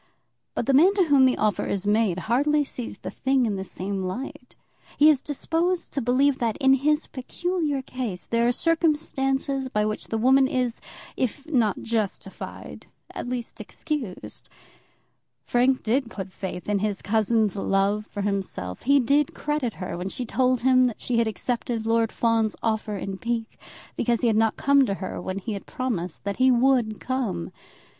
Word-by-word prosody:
But -, -, -1 dB
the 275 Hz, -, +2 dB
man 350 Hz, +9 st, +6 dB
to 390 Hz, -, +4 dB
whom 280 Hz, -5 st, +5 dB
the 255 Hz, -, +1 dB
offer 210 Hz, -4 st, +1 dB
is 200 Hz, 0 st, -2 dB
made 205 Hz, -3 st, +2 dB
hardly 290 Hz, +6 st, +2 dB
sees 250 Hz, -4 st, -7 dB
the -, -, -7 dB
thing 265 Hz, -1 st, +1 dB
in 210 Hz, -3 st, -1 dB
the 190 Hz, -, -3 dB
same 190 Hz, +1 st, -4 dB
light. 250 Hz, +6 st, -6 dB, 0.4 s
He 300 Hz, +1 st, +7 dB
is 290 Hz, -4 st, +4 dB
disposed 330 Hz, +5 st, -1 dB
to 275 Hz, -, -1 dB
believe 260 Hz, +3 st, +2 dB
that, 230 Hz, -3 st, 0 dB
in 270 Hz, -2 st, +4 dB
his 300 Hz, +3 st, +2 dB
peculiar 295 Hz, +1 st, -2 dB
case, 240 Hz, -9 st, -4 dB
there 235 Hz, 0 st, +1 dB
are -, -, +4 dB
circumstances 275 Hz, -4 st, 0 dB
by 210 Hz, -3 st, +1 dB
which 215 Hz, 0 st, -3 dB
the 225 Hz, -, -2 dB
woman 265 Hz, +4 st, +5 dB
is, 250 Hz, -3 st, -1 dB, 0.3 s
if 265 Hz, +3 st, -2 dB
not 240 Hz, -10 st, +1 dB
justified, 220 Hz, -4 st, -4 dB, 0.3 s
at -, -, -5 dB
least 245 Hz, -2 st, -4 dB
excused. 270 Hz, -, -5 dB, 1.0 s
Frank 255 Hz, +2 st, +2 dB
did 235 Hz, +2 st, +1 dB
put 190 Hz, -4 st, -7 dB
faith 180 Hz, -2 st, -6 dB
in 205 Hz, -1 st, +1 dB
his 205 Hz, -1 st, -2 dB
cousin's 220 Hz, -1 st, +2 dB
love 200 Hz, +2 st, +1 dB
for 205 Hz, -, -5 dB
himself. 195 Hz, -, -3 dB
He 280 Hz, +2 st, +4 dB
did 280 Hz, +3 st, +2 dB
credit 295 Hz, -6 st, -2 dB
her 185 Hz, -, -5 dB
when 185 Hz, +2 st, -3 dB
she 250 Hz, +4 st, -4 dB
told 255 Hz, 0 st, +1 dB
him 255 Hz, 0 st, +5 dB
that 235 Hz, -, -5 dB
she 240 Hz, -2 st, 0 dB
had 230 Hz, -, +2 dB
accepted 230 Hz, +1 st, -2 dB
Lord 225 Hz, 0 st, +2 dB
Fawn's 225 Hz, -2 st, +1 dB
offer 220 Hz, -1 st, -1 dB
in 195 Hz, 0 st, -5 dB
pique, 230 Hz, -1 st, -3 dB, 0.4 s
because 235 Hz, -2 st, 0 dB
he 240 Hz, -, +2 dB
had 225 Hz, -, +3 dB
not 225 Hz, 0 st, +2 dB
come 280 Hz, 0 st, +4 dB
to 195 Hz, -, -1 dB
her 190 Hz, -1 st, -5 dB
when 185 Hz, +1 st, -4 dB
he 205 Hz, +3 st, -4 dB
had 200 Hz, -, -7 dB
promised 230 Hz, -, -3 dB
that 200 Hz, 0 st, -3 dB
he 260 Hz, 0 st, +5 dB
would 245 Hz, -3 st, +3 dB
come. 250 Hz, -, -2 dB
240 Hz, 180 wpm, -25 LUFS, 210-270 Hz, 1.0 s, He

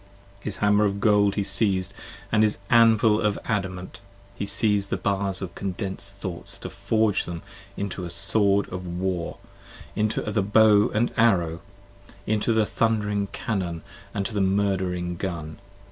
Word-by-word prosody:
His 100 Hz, -1 st, -5 dB
hammer 105 Hz, 0 st, +3 dB
of 100 Hz, -1 st, 0 dB
gold 105 Hz, -1 st, +3 dB
he 100 Hz, -, 0 dB
siez'd; 95 Hz, -1 st, 0 dB, 0.4 s
and 105 Hz, -, +3 dB
his 105 Hz, -1 st, +2 dB
anvil 115 Hz, -2 st, +5 dB
of 105 Hz, -2 st, +1 dB
adamant; 95 Hz, -4 st, -3 dB, 0.3 s
He 100 Hz, +1 st, -5 dB
siez'd 100 Hz, -1 st, +1 dB
the -, -, -1 dB
bars 100 Hz, -2 st, 0 dB
of 90 Hz, -, -6 dB
condens'd 100 Hz, 0 st, -3 dB
thoughts, 95 Hz, -4 st, -4 dB
to -, -, -8 dB
forge 110 Hz, -2 st, +1 dB
them, 85 Hz, -1 st, -6 dB, 0.3 s
5 -, -, -26 dB
Into 100 Hz, -1 st, -4 dB
the 90 Hz, -, -5 dB
sword 100 Hz, +2 st, +2 dB
of 90 Hz, 0 st, -6 dB
war, 90 Hz, 0 st, -3 dB, 0.6 s
into 105 Hz, +1 st, 0 dB
the 105 Hz, -1 st, 0 dB
bow 105 Hz, +1 st, +5 dB
and 115 Hz, +3 st, 0 dB
arrow; 85 Hz, -8 st, +2 dB, 0.6 s
Into 110 Hz, +2 st, +1 dB
the 110 Hz, -1 st, +3 dB
thundering 105 Hz, -2 st, 0 dB
cannon 90 Hz, -6 st, -3 dB, 0.3 s
and 100 Hz, -, -2 dB
into 115 Hz, -, -4 dB
the 105 Hz, -, 0 dB
murdering 95 Hz, -3 st, 0 dB
gun. 85 Hz, -4 st, -5 dB
100 Hz, 155 wpm, -25 LUFS, 95-105 Hz, 0.6 s, anvil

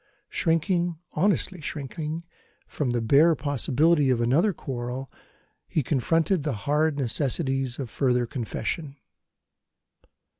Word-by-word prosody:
Shrinking, 170 Hz, 0 st, +1 dB, 0.2 s
honestly 190 Hz, -2 st, +1 dB
shrinking, 150 Hz, +3 st, -4 dB, 0.4 s
from 145 Hz, -4 st, -2 dB
the 120 Hz, -1 st, 0 dB
bare 150 Hz, +8 st, +5 dB
possibility 145 Hz, +1 st, +2 dB
of 125 Hz, -2 st, +2 dB
another 140 Hz, -, +3 dB
quarrel, 130 Hz, -4 st, -5 dB, 0.6 s
he 155 Hz, -, 0 dB
confronted 165 Hz, +7 st, +1 dB
the 145 Hz, -1 st, -1 dB
hard 150 Hz, +1 st, +2 dB
necessities 135 Hz, 0 st, -1 dB
of 135 Hz, -, -4 dB
further 125 Hz, -3 st, +1 dB
confession. 135 Hz, +4 st, -4 dB
145 Hz, 105 wpm, -26 LUFS, 130-165 Hz, 0.6 s, bare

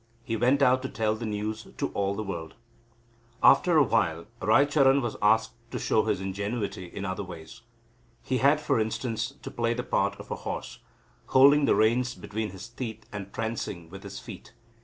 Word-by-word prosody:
He 115 Hz, -3 st, -2 dB
went 130 Hz, +5 st, +3 dB
out 130 Hz, 0 st, +4 dB
to 135 Hz, -, -4 dB
tell 110 Hz, -1 st, 0 dB
the 115 Hz, 0 st, -5 dB
news 110 Hz, +1 st, -4 dB
to -, -, -1 dB
all 100 Hz, 0 st, -1 dB
the 110 Hz, -, -3 dB
world. 85 Hz, -5 st, -6 dB, 0.9 s
After 175 Hz, -3 st, +6 dB
a 150 Hz, -, +7 dB
while 85 Hz, -10 st, 0 dB, 0.2 s
Raicharan 140 Hz, -1 st, +4 dB
was 120 Hz, -4 st, -3 dB
asked 110 Hz, +2 st, +3 dB, 0.2 s
to -, -, -4 dB
show -, -, +1 dB
his -, -, 0 dB
ingenuity 100 Hz, +1 st, -3 dB
in 100 Hz, +3 st, -6 dB
other 95 Hz, +1 st, -3 dB
ways. 90 Hz, +4 st, -10 dB, 0.6 s
He 130 Hz, -1 st, -1 dB
had, 140 Hz, +3 st, +4 dB
for 150 Hz, -6 st, +1 dB
instance, 110 Hz, +1 st, -2 dB
to -, -, -6 dB
play 115 Hz, 0 st, 0 dB
the 125 Hz, -, -3 dB
part -, -, 0 dB
of -, -, -10 dB
a -, -, -2 dB
horse, -, -, -6 dB, 0.5 s
holding 140 Hz, +2 st, +6 dB
the -, -, +4 dB
reins 120 Hz, +3 st, +2 dB
between 110 Hz, +1 st, -4 dB
his 95 Hz, +3 st, -9 dB
teeth 115 Hz, -1 st, -7 dB
and 100 Hz, -2 st, -7 dB
prancing 105 Hz, -7 st, -4 dB
with 95 Hz, +1 st, -9 dB
his 100 Hz, 0 st, -8 dB
feet. 115 Hz, -4 st, -10 dB
110 Hz, 185 wpm, -27 LUFS, 100-125 Hz, 0.9 s, a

